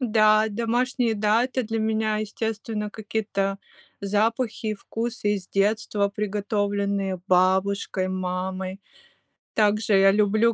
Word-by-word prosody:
Да, 215 -2 +4
домашние, 235 +2 0
да, 215 +3 +2
это 255 0 -2
для 225 0 -3
меня, 220 0 0
естественно, 215 0 -3
какие-то 205 -2 -2 0.4
запахи 220 +3 0
и 215 - -1
вкусы 225 0 -2
из 190 -3 -5
детства, 205 0 +1
приготовленные 200 -2 -1
бабушкой, 190 +1 +2
мамой. 185 +1 -3 0.7
Также 215 0 +2
я 195 0 +6
люблю 215 +3 +3
210 Hz, 110 wpm, -25 LUFS, 195-220 Hz, 0.7 s, я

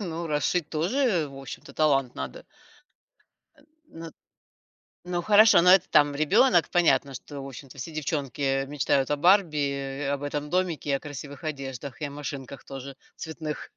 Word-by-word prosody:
Ну, 170 -3 -4
расшить 150 +2 0
тоже, 180 - 0
в 135 - -12
общем-то, 135 +1 -9
талант 135 -4 +1
надо. - - -7 1.1
Э, - - -22 0.3
на 165 - -10 1.0
ну, 175 -1 -1
хорошо, 210 +1 +6
но 180 - +5
это 190 -2 +5
там 145 -1 +4
ребёнок 175 - +4
понятно, 165 -5 +2
что, 140 +2 -8
в - - -7
общем-то, 135 +1 -11
все 135 +5 -6
девчонки 140 -3 -2
мечтают 140 -1 0
о 145 - +1
Барби, 175 -1 +4
э, 140 0 -4
об 140 0 -4
этом 145 +1 -3
домике 180 -4 -1
и - - +2
о 135 - +1
красивых 145 +1 -9
одеждах, 135 -2 -6
и - - -1
о - - -9
машинках 140 -1 -7
тоже 135 0 -8 0.2
цветных. 160 -2 -6
150 Hz, 160 wpm, -26 LUFS, 140-170 Hz, 1.1 s, хорошо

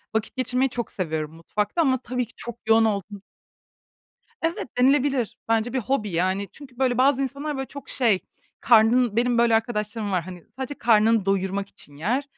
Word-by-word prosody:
Vakit 220 +2 -1
geçirmeyi 255 +1 +1
çok 240 -1 -4
seviyorum 160 -4 -3
mutfakta 210 - -2
ama 265 -4 +3
tabii 250 0 -2
ki 230 - -21
çok 240 - -6
yoğun 225 0 +5
olduğum 200 -1 -2 1.2
Evet, 325 -5 -2
denilebilir. 265 -3 +2
Bence 225 +1 +1
bir 260 - 0
hobi. 240 -4 -1
Yani 185 +3 0
çünkü 265 -4 -14
böyle, 250 -2 +1
bazı 275 +1 +4
insanlar, 280 +2 -3
böyle 270 - -3
çok 280 -1 -10
şey, 225 -7 +3 0.4
karnın 235 0 +4
Benim 240 0 +2
böyle 235 -1 +4
arkadaşlarım 220 -1 -1
var, 180 - +1
hani, 180 -2 -10
sadece 265 +2 -4
karnını 225 -3 +3
doyurmak 195 0 0
için 145 - -9
yer 235 - -1
230 Hz, 170 wpm, -24 LUFS, 205-260 Hz, 1.2 s, yoğun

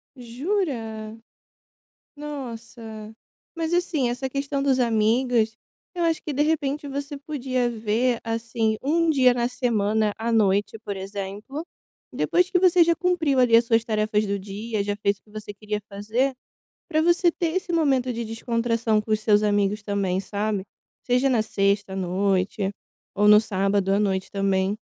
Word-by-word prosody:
Jura? 235 - -3 1.0
Nossa. 230 -6 -8 0.4
Mas 325 0 -2
assim, 345 -8 +1
essa 255 +2 -3
questão 275 +1 -2
dos 270 -2 +2
amigos, 225 0 +2 0.4
eu 350 - -2
acho 325 -1 0
que 300 - -4
de 285 +2 +1
repente 295 -2 -1
você 280 +1 -5
podia 260 -4 -2
ver, 230 +2 0
assim, 225 -1 -1
1 330 +4 +2
dia 255 -4 +5
na 240 -1 0
semana 220 -4 0
à 230 +1 -1
noite, 205 0 +2
por 200 -1 -4
exemplo, 200 - -6 0.5
depois 360 +2 +1
que 365 - +3
você 360 -1 +5
já 335 0 +4
cumpriu 340 -7 +1
ali 240 -2 +6
as 235 - +5
suas 230 -1 +2
tarefas 215 -1 0
do 200 0 -1
dia, 205 +2 -4
já 205 0 -2
fez 200 -1 0
o - - -42
que 210 - -24
você 210 -1 -7
queria 210 0 -4
fazer, 220 +7 -1 0.5
para 315 -1 +2
você 345 +1 +4
ter 335 0 -2
esse 365 -1 -2
momento 265 -6 +2
de 235 0 -4
descontração 230 -1 0
com 220 - -11
os 215 - +2
seus 210 -1 +3
amigos 205 0 +1
também, 195 -2 -1
sabe? 205 0 -2 0.4
Seja 250 +2 +2
na 235 -4 +2
sexta 200 -2 0
à - - -4
noite 190 +1 0 0.4
ou 210 +1 +3
no 210 0 +8
sábado 195 -2 0
à 200 - +3
noite 190 -2 -1
também. 195 0 0
225 Hz, 160 wpm, -24 LUFS, 205-275 Hz, 1.0 s, no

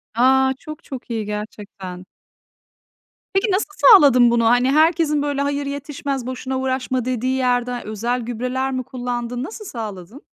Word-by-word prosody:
A, 265 +2 +4
çok 305 -1 -10
çok 260 -3 -9
iyi 225 -2 -2
gerçekten. 205 -3 -7 1.3
Peki, 390 +2 +1
nasıl 380 +3 +1 0.2
sağladın 260 - +7
bunu? 235 -1 +2
Hani, 245 +3 +4
herkesin, 310 0 +3
böyle, 285 -1 -1
"Hayır 285 0 -1
yetişmez, 280 -2 -4
boşuna 260 +1 -4
uğraşma!" 260 -1 -1
dediği 255 +1 -1
yerden 245 -1 0
özel 235 +4 -2
gübreler 250 +3 -2
mi 255 -1 -2
kullandın? 245 -1 -4
Nasıl 425 - -8
sağladın? 215 - -7
255 Hz, 140 wpm, -21 LUFS, 235-280 Hz, 1.3 s, sağladın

